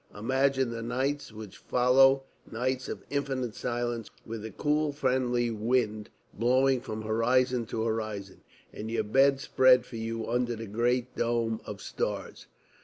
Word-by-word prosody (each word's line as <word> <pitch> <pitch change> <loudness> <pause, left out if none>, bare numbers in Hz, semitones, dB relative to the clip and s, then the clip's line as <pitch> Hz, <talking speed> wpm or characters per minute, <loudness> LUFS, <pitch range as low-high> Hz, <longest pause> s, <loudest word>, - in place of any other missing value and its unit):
Imagine 130 +2 +1
the 115 -1 -5
nights 130 +4 -2
which 110 -3 -10
follow 135 +2 +4 0.3
nights 130 +3 -2
of - - -6
infinite 135 -5 -2
silence, 120 -2 -3 0.2
with 115 -1 -6
a 110 - -5
cool 150 +7 0
friendly 125 -4 0
wind 110 -1 0 0.2
blowing 130 +3 +2
from 110 -2 -6
horizon 120 +2 +1
to 110 - -2
horizon 110 -4 -3 0.3
and 110 +1 -6
your 115 -1 0
bed 135 +5 +4
spread 130 -2 +4
for 115 - -8
you 115 0 -4
under 120 0 0
the 115 +1 -6
great 120 +4 0
dome 115 -1 0
of - - -7
stars. - - -4
120 Hz, 145 wpm, -29 LUFS, 110-130 Hz, 0.3 s, follow